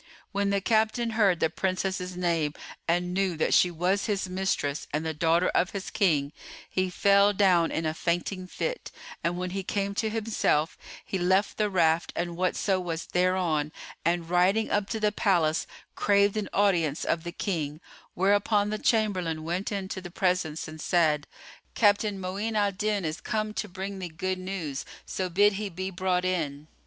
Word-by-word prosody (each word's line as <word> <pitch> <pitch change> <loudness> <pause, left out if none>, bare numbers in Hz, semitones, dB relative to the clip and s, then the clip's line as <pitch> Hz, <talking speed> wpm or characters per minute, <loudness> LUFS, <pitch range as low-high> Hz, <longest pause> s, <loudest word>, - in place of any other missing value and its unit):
When 200 0 0
the 200 0 +1
captain 225 +2 +1
heard 205 -6 +3
the - - +3
Princess's 185 -1 -2
name 165 -4 0 0.3
and 175 +1 +1
knew 185 -3 0
that 160 - +1
she 180 - +5
was 180 +5 0
his 200 -3 -1
mistress 185 -6 -1
and 155 +2 -2
the 160 - -1
daughter 165 +3 +2
of 180 - +2
his 195 -1 -5
King, 150 -8 +1 0.3
he 185 0 0
fell 200 +2 +4
down 185 -4 +4
in 160 - -2
a 155 - 0
fainting 175 +3 -2
fit, - - -4 0.3
and 170 +1 0
when 180 0 -3
he 195 +1 -2
came 200 +1 -2
to 220 +2 0
himself, 210 -8 0 0.3
he 190 - -2
left 190 +3 +2
the 210 -1 +1
raft 165 -3 +2
and 175 -1 -2
whatso 185 +2 +1
was 170 -2 -4
thereon 180 -5 +1 0.3
and 170 0 0
riding 190 +5 +3
up 205 0 0
to 225 - -2
the 210 -1 +2
palace, 175 -7 +1 0.3
craved 200 0 +3
an 215 -2 -2
audience 175 -7 +2
of 165 -1 0
the 175 - -5
King; 155 -7 -3 0.4
whereupon 205 +2 +2
the 215 - -2
chamberlain 185 -9 +1
went 175 +6 -2
in 195 -2 -3
to 190 - -4
the 175 - -8
presence 175 -3 -1
and 155 0 -9
said, 155 -5 +2 0.5
"Captain 205 -1 +3
Mu'in 200 +4 -3
al 205 -1 +2
Din 205 -1 -1
is 155 0 -3
come 215 0 -2
to 215 - -3
bring 195 +1 -5
thee 185 - -4
good 185 +4 -3
news; 180 -7 -4 0.2
so 185 -1 -3
bid 205 +4 +4
he 210 - -3
be 185 +2 -4
brought 180 0 0
in." 155 -5 -2
185 Hz, 180 wpm, -27 LUFS, 170-200 Hz, 0.5 s, she